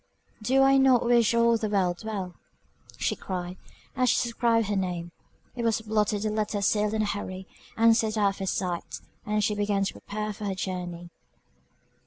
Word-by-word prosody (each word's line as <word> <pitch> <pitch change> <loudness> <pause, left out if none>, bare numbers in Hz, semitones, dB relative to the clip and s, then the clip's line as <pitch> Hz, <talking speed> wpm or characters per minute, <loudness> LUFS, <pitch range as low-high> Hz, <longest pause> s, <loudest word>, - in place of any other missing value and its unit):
"Do 265 +5 +3
I 270 0 +5
not 265 -3 +4
wish 235 -1 +4
all 235 0 +4
the 220 -1 -2
world 185 -2 0
well?" 195 -5 -4 0.6
she - - 0
cried, 180 -1 -5 0.4
as 255 -2 +2
she - - +4
subscribed 230 -1 +1
her 205 +1 -1
name 175 -3 -2 0.4
It 245 - -4
was 230 -1 +1
blotted, 210 -1 0
the 215 - 0
letter 210 -1 -1
sealed 210 +1 +1
in 215 - +1
a - - 0
hurry, 190 -2 -4 0.3
and 225 0 +6
sent 220 -1 0
out 205 -2 +4
of 195 - -7
her 195 - -3
sight; 180 -2 -3 0.3
and 210 0 +1
she 210 - +1
began 205 -1 0
to 195 - -2
prepare 210 +1 -5
for 210 +1 -7
her 195 -1 -2
journey. 175 -2 -5
210 Hz, 190 wpm, -27 LUFS, 190-225 Hz, 0.6 s, and